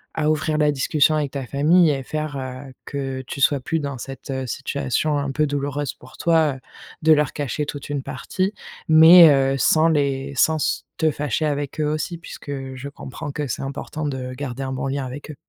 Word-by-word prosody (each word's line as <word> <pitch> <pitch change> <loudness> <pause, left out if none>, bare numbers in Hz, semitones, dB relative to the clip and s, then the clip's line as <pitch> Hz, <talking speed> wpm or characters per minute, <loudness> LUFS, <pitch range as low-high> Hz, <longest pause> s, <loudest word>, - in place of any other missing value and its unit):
à 155 -1 +2
ouvrir 155 0 0
la 150 -1 +3
discussion 145 +2 +2
avec 145 -3 -1
ta 135 -2 -4
famille 155 +6 +4
et 135 -2 -2
faire, 155 +1 -4
heu, 130 0 -7
que 135 -2 -4
tu 140 - -6
sois 140 +2 +4
plus 160 +5 -2
dans 140 -3 -5
cette, 135 +2 -8
heu, 130 -1 -3
situation 140 +3 -1
un 140 -1 -2
peu 150 +3 +1
douloureuse 145 0 -2
pour 130 +1 -16
toi, 160 -4 +2
heu, - - -11 0.4
de 160 0 +7
leur 150 -2 +2
cacher 145 +1 -3
toute 145 -1 -6
une 145 -1 -2
partie. 135 +9 -3 0.4
Mais 160 +2 +9
heu, 135 -1 +3
sans 160 +4 +4
les 140 -3 0
sans 160 +4 +3
s 150 - -1
te 160 -1 +2
fâcher 150 +1 -1
avec 145 -1 -2
eux 155 - +1
aussi 155 +3 -2
puisque 165 -3 -9 0.2
je 135 +2 -7
comprends 140 0 -7
que 145 0 -3
c'est 120 - -4
important 140 +2 -5
de 130 -2 -4
garder 130 0 -5
un 130 0 -3
bon 130 +1 -3
lien 135 0 -2
avec 140 +4 -7
eux. - - -10
145 Hz, 210 wpm, -22 LUFS, 135-155 Hz, 0.4 s, Mais